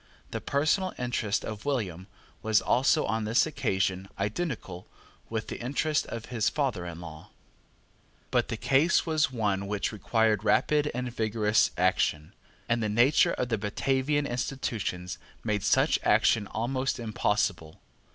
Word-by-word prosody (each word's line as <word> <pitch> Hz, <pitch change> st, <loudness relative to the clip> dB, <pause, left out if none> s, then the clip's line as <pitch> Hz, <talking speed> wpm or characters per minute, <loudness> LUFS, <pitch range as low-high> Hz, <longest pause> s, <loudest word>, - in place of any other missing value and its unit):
The -, -, -4 dB
personal 155 Hz, +7 st, +1 dB
interest 120 Hz, -4 st, -1 dB
of 110 Hz, -1 st, -6 dB
William 100 Hz, -, -2 dB, 0.3 s
was 110 Hz, -1 st, +3 dB
also 135 Hz, +5 st, +2 dB
on 110 Hz, +1 st, -1 dB
this 110 Hz, +3 st, +3 dB
occasion 95 Hz, -, -1 dB
identical 105 Hz, -, -3 dB, 0.4 s
with 110 Hz, -1 st, -3 dB
the -, -, -6 dB
interest 145 Hz, +4 st, 0 dB
of 115 Hz, -1 st, -6 dB
his 110 Hz, -3 st, +2 dB
father 125 Hz, -12 st, -1 dB
in 85 Hz, -1 st, -7 dB
law. 80 Hz, -2 st, -10 dB, 1.0 s
But -, -, +2 dB
the -, -, -4 dB
case 145 Hz, +6 st, +3 dB
was 155 Hz, -3 st, +1 dB
one 100 Hz, -5 st, -1 dB
which 105 Hz, 0 st, -1 dB
required 110 Hz, -1 st, +1 dB
rapid 150 Hz, +6 st, +2 dB
and 125 Hz, -1 st, -3 dB
vigorous 110 Hz, -1 st, +2 dB
action; 85 Hz, -4 st, +1 dB, 0.3 s
and 115 Hz, 0 st, +1 dB
the 110 Hz, -, 0 dB
nature 120 Hz, +7 st, +4 dB
of 125 Hz, -, -2 dB
the 110 Hz, -3 st, 0 dB
Batavian 135 Hz, +7 st, 0 dB
institutions 115 Hz, -8 st, -3 dB, 0.2 s
made 105 Hz, -1 st, 0 dB
such -, -, +3 dB
action 105 Hz, -3 st, +3 dB
almost 130 Hz, +5 st, -2 dB
impossible. 105 Hz, -7 st, -1 dB
110 Hz, 140 wpm, -28 LUFS, 100-135 Hz, 1.0 s, nature